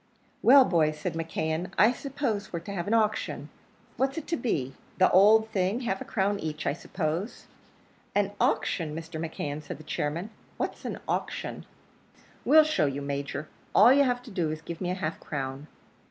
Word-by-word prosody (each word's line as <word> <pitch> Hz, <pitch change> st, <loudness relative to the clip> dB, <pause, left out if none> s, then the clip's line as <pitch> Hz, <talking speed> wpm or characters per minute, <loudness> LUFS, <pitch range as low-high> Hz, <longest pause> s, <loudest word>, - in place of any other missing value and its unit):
"Well, 265 Hz, +2 st, +8 dB
boys!" 155 Hz, -5 st, +2 dB
said -, -, -3 dB
McKeon; 165 Hz, +2 st, -3 dB
"I 220 Hz, +4 st, +6 dB
suppose 250 Hz, -6 st, -3 dB
we're 170 Hz, -, -3 dB
to 200 Hz, +4 st, -7 dB
have 175 Hz, -1 st, -3 dB
an 215 Hz, -, +1 dB
auction. 215 Hz, -1 st, 0 dB, 0.5 s
What's 270 Hz, +2 st, 0 dB
it 320 Hz, -, -4 dB
to 335 Hz, -, +1 dB
be? 140 Hz, -, -1 dB, 0.2 s
the 185 Hz, -, +5 dB
owld 215 Hz, +4 st, +6 dB
thing 195 Hz, +4 st, 0 dB
half 195 Hz, -6 st, -2 dB
a -, -, -5 dB
crown 200 Hz, 0 st, 0 dB
each, 155 Hz, -1 st, -4 dB
I -, -, +1 dB
suppose?" 165 Hz, +5 st, -3 dB, 0.7 s
"An 200 Hz, -1 st, +2 dB
auction, 155 Hz, -4 st, 0 dB
Mr. 165 Hz, 0 st, -6 dB
McKeon!" 150 Hz, -2 st, -4 dB
said -, -, -7 dB
the 155 Hz, -, -12 dB
chairman. 155 Hz, +6 st, -3 dB, 0.3 s
"What's -, -, -4 dB
an -, -, -3 dB
auction?" -, -, -3 dB, 0.8 s
"We'll 310 Hz, +1 st, +8 dB
show 250 Hz, -, +1 dB
you, 140 Hz, +1 st, -3 dB
Major. 140 Hz, +1 st, -4 dB, 0.3 s
All 230 Hz, +6 st, +8 dB
you've 255 Hz, -3 st, +2 dB
to 245 Hz, -, -11 dB
do 175 Hz, -5 st, -1 dB
is 155 Hz, -, -3 dB
to 155 Hz, -, -21 dB
give 170 Hz, +1 st, -6 dB
me 180 Hz, -, -1 dB
half 180 Hz, 0 st, -2 dB
a -, -, -20 dB
crown." 135 Hz, 0 st, -4 dB
180 Hz, 185 wpm, -28 LUFS, 155-220 Hz, 0.8 s, Well